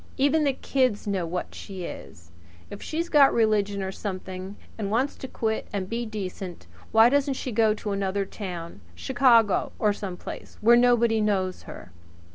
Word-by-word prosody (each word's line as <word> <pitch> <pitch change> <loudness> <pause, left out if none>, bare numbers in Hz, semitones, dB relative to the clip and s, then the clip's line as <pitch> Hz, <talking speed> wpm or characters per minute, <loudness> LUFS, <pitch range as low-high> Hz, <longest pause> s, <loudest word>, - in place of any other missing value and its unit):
Even 290 +3 +3
the 280 - +2
kids 255 -5 0
know 195 -4 -1
what 180 +2 -4
she 190 -2 -8
is. 85 - -9 0.4
If 205 - -8
she's 330 +2 -3
got 290 -5 +6
religion 205 -3 +1
or 190 - -3
something, 190 -1 -6 0.2
and 205 -3 -3
wants 250 +7 0
to 265 - -7
quit 220 -3 -2
and 195 -2 -3
be 230 +3 -3
decent, 190 -4 -6 0.3
why 225 +1 +7
doesn't 275 +1 +1
she 255 - -4
go 220 -1 +3
to 210 -1 -5
another 195 0 -1
town 175 - -7
Chicago 240 - +3
or 210 -1 +2
some 190 -3 -6
place - - -9
where 235 +2 +6
nobody 235 -2 +4
knows 190 -3 0
her?" 90 - -10
210 Hz, 170 wpm, -26 LUFS, 190-240 Hz, 0.4 s, why